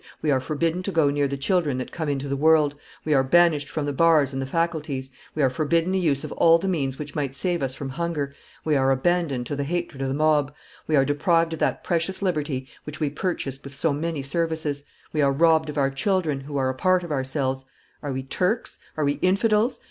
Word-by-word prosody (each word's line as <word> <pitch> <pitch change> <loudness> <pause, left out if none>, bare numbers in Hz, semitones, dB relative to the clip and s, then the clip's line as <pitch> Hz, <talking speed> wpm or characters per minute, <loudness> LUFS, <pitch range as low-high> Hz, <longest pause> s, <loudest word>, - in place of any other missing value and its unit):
"We 150 - +2
are 130 -2 +2
forbidden 165 +5 -1
to 195 - -3
go 160 -5 +3
near 145 0 +1
the 140 0 -4
children 150 -2 +1
that 130 - -5
come 160 -3 -3
into 140 0 -2
the 140 - -1
world, 150 0 +4 0.3
we 155 - +2
are 135 -2 +4
banished 155 0 +3
from 155 -1 -3
the 145 - -2
bars 155 -2 +4
and 135 - -2
the 135 - -3
faculties, 150 -4 -2 0.2
we 155 - +1
are 135 - +4
forbidden 165 +6 +1
the 190 - +1
use 145 -6 +1
of - - -6
all 165 0 +5
the 185 +3 -4
means 140 -8 -1
which 145 -1 -7
might 140 -3 -2
save 175 +2 -1
us 130 -1 -2
from 135 -1 -5
hunger, 150 -1 -3 0.3
we 155 -1 +2
are 135 -1 +3
abandoned 135 -2 +1
to 145 - -3
the 140 - -2
hatred 170 -2 -3
of 135 - -1
the 135 - -1
mob, 150 -1 +2 0.3
we 155 - +2
are 135 -1 +4
deprived 165 +3 +2
of 160 - -5
that - - 0
precious 175 +3 -1
liberty 150 -7 -1 0.2
which 150 0 -8
we 150 -3 0
purchased 145 -5 -3
with 140 0 -9
so 145 +2 +1
many 155 -1 -3
services, 155 -1 -2 0.3
we 155 - +1
are 140 -1 +4
robbed 160 +1 +3
of 150 - -5
our 135 -1 +2
children, 155 0 0
who 140 +1 -6
are 130 -1 +1
a - - -1
part 185 +6 +2
of 170 - -7
ourselves.... 135 -1 -1 0.4
Are 145 - -4
we 130 0 -3
Turks? 185 - -1 0.2
Are 155 - +1
we 145 0 0
infidels? 210 +5 +2
150 Hz, 235 wpm, -24 LUFS, 135-165 Hz, 0.4 s, all